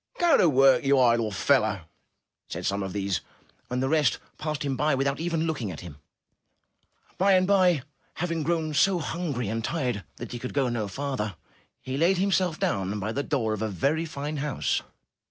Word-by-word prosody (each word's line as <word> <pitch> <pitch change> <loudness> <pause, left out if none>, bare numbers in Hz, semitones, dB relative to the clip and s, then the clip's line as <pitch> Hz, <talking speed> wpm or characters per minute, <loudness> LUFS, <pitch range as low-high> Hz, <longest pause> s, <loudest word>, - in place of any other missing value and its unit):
''Go 345 -4 +4
to 180 - +5
work, 135 -2 +5
you 140 0 +4
idle 120 -3 +3
fellow,'* 105 -2 +2 0.7
said - - -5
some 100 +1 0
of 95 -1 -3
these; 100 -1 -1 0.5
and 125 +1 -1
the - - +1
rest 150 -5 +2 0.2
passed 155 -2 -3
him 135 -1 -1
by 150 +2 +2
without 140 +2 0
even 165 -1 -1
looking 145 -10 -2
at 80 - -7
him. 85 -6 -10 1.2
By 195 +1 +5
and 185 0 +4
by, 180 -7 +3 0.3
having 165 -1 -2
grown 160 -1 -1
so 185 +6 +4
hungry 155 - -3
and 115 +2 -2
tired 125 - -2
that - - -8
he 120 - -5
could 125 +2 -6
go 135 -3 +2
no 115 -3 -2
farther, 125 -4 -3 0.5
he 130 +1 -3
laid 175 +5 +3
himself 185 -3 +1
down 100 +1 -1
by 105 +2 -2
the 140 - -1
door 120 -7 -1
of 110 - -4
a 110 - -1
very 140 - 0
fine 150 0 -4
house. 145 -2 -1
140 Hz, 190 wpm, -26 LUFS, 110-160 Hz, 1.2 s, to